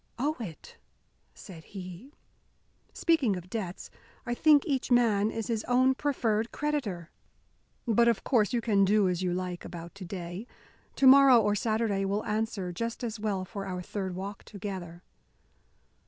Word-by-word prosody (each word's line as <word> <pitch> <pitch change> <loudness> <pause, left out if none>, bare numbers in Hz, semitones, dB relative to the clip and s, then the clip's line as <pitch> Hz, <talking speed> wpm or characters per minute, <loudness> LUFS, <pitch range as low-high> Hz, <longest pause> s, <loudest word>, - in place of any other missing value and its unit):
"Owe 295 +5 -1
it?" 180 -9 -9 0.6
said 165 - -11
he. 185 - -9 0.8
"Speaking 300 - +2
of 180 0 -9
debts, 195 -6 -5 0.3
I 240 - -1
think 295 +2 +5
each 275 -6 -1
man 220 -4 +3
is 225 -1 -4
his 225 -3 -2
own 255 +1 +4
preferred 235 -6 -1
creditor. 235 - -3 0.8
But 235 +1 +4
of 230 -4 +2
course 225 -6 +2
you 240 - 0
can 205 -3 +3
do 200 0 +3
as 180 -1 -1
you 180 -1 0
like 180 0 -4
about 170 0 -8
to 200 - -10
day. 180 +4 -6 0.5
Tomorrow 270 -2 +7
or 210 -2 +2
Saturday 215 -1 0
will 200 +2 -1
answer 210 -4 -2
just 230 +7 -4
as 230 -2 -4
well 200 -3 -2
for 195 0 -6
our 180 -1 -4
third 190 -1 -4
walk 195 +2 -6
together." 185 -4 -7
210 Hz, 155 wpm, -29 LUFS, 185-240 Hz, 0.8 s, Tomorrow